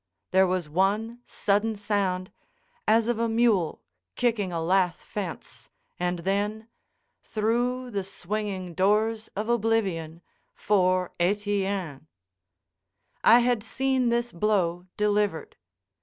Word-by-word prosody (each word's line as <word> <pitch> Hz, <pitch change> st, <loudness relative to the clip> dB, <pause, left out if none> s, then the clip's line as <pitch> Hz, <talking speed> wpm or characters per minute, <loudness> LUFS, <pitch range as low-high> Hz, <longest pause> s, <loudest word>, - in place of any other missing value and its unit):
There 190 Hz, 0 st, +5 dB
was 180 Hz, -3 st, -1 dB
one 205 Hz, +8 st, 0 dB
sudden 210 Hz, +2 st, 0 dB
sound, 200 Hz, -3 st, -1 dB, 0.6 s
as 225 Hz, 0 st, +4 dB
of 240 Hz, -2 st, 0 dB
a 230 Hz, 0 st, +1 dB
mule 225 Hz, -7 st, +2 dB, 0.3 s
kicking 220 Hz, -6 st, 0 dB
a 170 Hz, -, -2 dB
lath 180 Hz, +1 st, +1 dB
fence, 190 Hz, -6 st, -7 dB, 0.3 s
and 180 Hz, 0 st, 0 dB
then—through 220 Hz, +4 st, -3 dB
the 200 Hz, -3 st, -2 dB
swinging 190 Hz, -1 st, -4 dB
doors 215 Hz, +4 st, +1 dB
of 210 Hz, +2 st, -3 dB
oblivion 200 Hz, -8 st, 0 dB, 0.3 s
for 185 Hz, -3 st, +2 dB
Etienne. 195 Hz, -5 st, -1 dB, 1.2 s
I 240 Hz, +2 st, +7 dB
had 240 Hz, -2 st, +1 dB
seen 260 Hz, +2 st, 0 dB
this 235 Hz, 0 st, 0 dB
blow 180 Hz, -2 st, 0 dB
delivered. 210 Hz, -4 st, 0 dB
205 Hz, 105 wpm, -26 LUFS, 185-225 Hz, 1.2 s, I